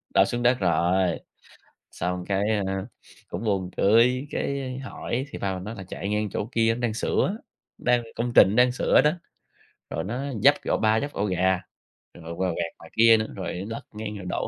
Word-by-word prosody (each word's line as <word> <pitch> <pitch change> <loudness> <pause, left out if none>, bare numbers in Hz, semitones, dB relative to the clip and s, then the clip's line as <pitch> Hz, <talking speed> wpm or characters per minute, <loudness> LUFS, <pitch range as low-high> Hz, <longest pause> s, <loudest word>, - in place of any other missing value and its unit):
Đổ - - +6
xuống 120 0 -3
đất 125 -1 +3
rồi, 90 +1 +2 0.7
xong 90 +1 -3
cái, 100 +1 0 0.2
ơ, 95 +2 -3 0.4
cũng 90 +6 -5
buồn 95 -4 0
cười, 125 +6 +4
cái 135 -2 -3
hỏi 130 -1 -4
thì - - -6
ba 95 -1 -1
mình 90 - -6
nói 110 +3 -6
là 95 - -8
"Chạy 100 +2 -6
ngang 105 0 0
chỗ 100 - -3
kia 115 0 +2
nó 120 - -7
đang 115 -3 0
sửa, 190 - 0 0.4
đang 120 -1 +2
công 120 +1 -2
trình 100 +3 +7
đang 125 0 +5
sửa 125 - +3
đó, 150 - +3 0.8
rồi - - -3
nó 115 +7 -4 0.2
vấp - - +7
cái - - -3
ổ - - +3
ba 110 0 +3
vấp 145 - -4
ổ 100 - -1
gà, 95 -1 +1 0.5
rồi 85 -1 -9
va 95 -1 +1
quẹt 85 -1 -3
ngoài - - -14
kia 115 0 +7
nữa, 110 - -2
rồi 95 - -4 0.2
lật 115 - -5
ngang 105 -1 -5
rồi 95 - -8
đổ - - -2
105 Hz, 205 wpm, -25 LUFS, 95-120 Hz, 0.8 s, trình